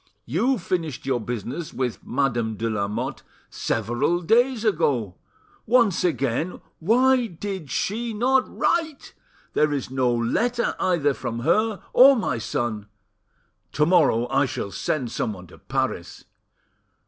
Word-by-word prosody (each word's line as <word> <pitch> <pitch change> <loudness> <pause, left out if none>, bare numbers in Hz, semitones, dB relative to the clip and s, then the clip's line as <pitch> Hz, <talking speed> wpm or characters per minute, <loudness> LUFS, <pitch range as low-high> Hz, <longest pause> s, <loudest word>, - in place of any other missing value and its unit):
You 225 - +1
finished 170 - -3
your 130 -2 0
business 120 - -5
with 125 -3 -3
Madame 120 -5 -1
de 115 - -2
Lamotte 110 +5 -3 0.3
several 120 - -1
days 235 +5 +2
ago: 125 - +1 0.5
once 230 -6 +3
again, 155 0 -1 0.2
why 245 +6 +3
did 190 -4 -6
she 230 - -2
not 255 +4 +2
write? 320 -4 -1 0.4
There 150 0 +2
is 140 -3 -3
no 130 -2 +1
letter, 225 - 0
either 160 -6 +2
from 120 -3 -5
her 210 - +1
or 270 +2 +8
my 220 - -1
son! 110 -2 -3 0.9
To 150 - +3
morrow 150 -9 +3
I 145 - +2
shall 125 -7 -4
send 120 +5 -2
someone 100 -7 -3
to - - -16
Paris." - - -3
150 Hz, 125 wpm, -24 LUFS, -, 0.9 s, or